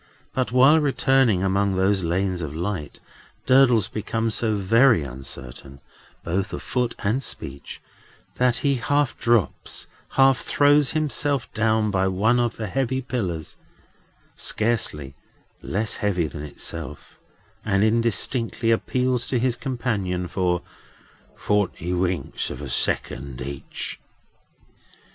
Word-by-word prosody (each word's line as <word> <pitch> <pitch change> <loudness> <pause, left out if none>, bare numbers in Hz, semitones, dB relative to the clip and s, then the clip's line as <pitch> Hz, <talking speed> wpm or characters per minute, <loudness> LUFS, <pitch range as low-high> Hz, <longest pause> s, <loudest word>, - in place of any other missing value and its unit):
But, 130 -2 -1
while 135 +6 +6
returning 135 -8 +2
among 95 0 +1
those 95 0 +2
lanes 90 +2 -1
of 75 -2 -5
light, 85 -2 -4 0.5
Durdles 125 -6 +5
becomes 115 +1 -2
so 110 -1 +1
very 115 - +4
uncertain, 65 0 -7 0.4
both 95 +4 -2
of - - -5
foot 125 -2 -1
and 110 +6 +1
speech, 70 - -5 0.6
that 125 -1 +3
he 140 -1 +3
half 145 +2 +1
drops, 115 -4 0 0.3
half 135 -1 +5
throws 145 0 +3
himself 145 -3 -1
down, 110 -1 +1
by 95 0 +1
one 110 +6 +2
of 120 -1 0
the 110 - -3
heavy 130 +4 -1
pillars, 90 - -4 0.8
scarcely 100 - -1 0.5
less 110 +4 -2
heavy 100 -6 0
than 75 -1 -6
itself, 75 +1 -6 0.4
and 100 -1 +2
indistinctly 115 +1 +1
appeals 125 +1 0
to 130 - 0
his 120 0 +1
companion 115 -8 -2
for 90 -1 0 0.7
forty 100 -4 -1
winks 90 0 -1
of - - -7
a - - -6
second 70 -3 -1
each. 70 +1 -6
110 Hz, 120 wpm, -23 LUFS, 90-125 Hz, 0.8 s, while